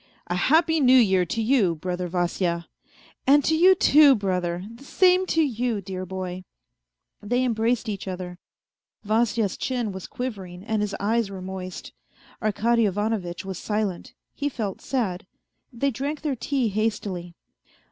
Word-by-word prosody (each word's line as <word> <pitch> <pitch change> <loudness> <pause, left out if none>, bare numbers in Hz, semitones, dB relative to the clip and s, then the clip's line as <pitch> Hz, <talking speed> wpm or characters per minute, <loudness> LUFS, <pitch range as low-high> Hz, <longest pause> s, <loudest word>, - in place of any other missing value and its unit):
" - - -38
A 175 - -3
happy 320 - +3
New 260 -2 +6
Year 190 -6 +4
to 225 +7 -1
you, 215 -8 +3
brother 180 +2 -3
Vasya." 175 -1 -1 0.3
" - - -28
And 285 +1 +6
to 320 - +3
you 370 +4 +6
too, 295 -5 +6
brother, 180 -4 -2
the 235 - -14
same 370 +5 +3
to 325 -2 +2
you, 245 -5 -1
dear 185 -1 -6
boy." 185 0 -5 0.8
They 245 +5 0
embraced 230 0 0
each 200 -2 -4
other. 180 -1 -6 0.7
Vasya's 220 -1 +1
chin 245 -5 -2
was 190 -1 -7
quivering 195 -8 -6
and 220 0 -1
his 205 -1 -2
eyes 220 +1 +1
were 195 -1 -7
moist. 185 -1 -7 0.5
Arkady 225 +1 +2
Ivanovitch 200 -3 -2
was 190 -2 -5
silent, 210 -4 -3 0.2
he 290 0 -2
felt 215 -8 -4
sad. 195 -9 -2 0.4
They 275 +3 0
drank 280 +5 -4
their 295 -4 -1
tea 255 -1 -1
hastily. 200 -5 -2
215 Hz, 155 wpm, -25 LUFS, 185-250 Hz, 0.8 s, New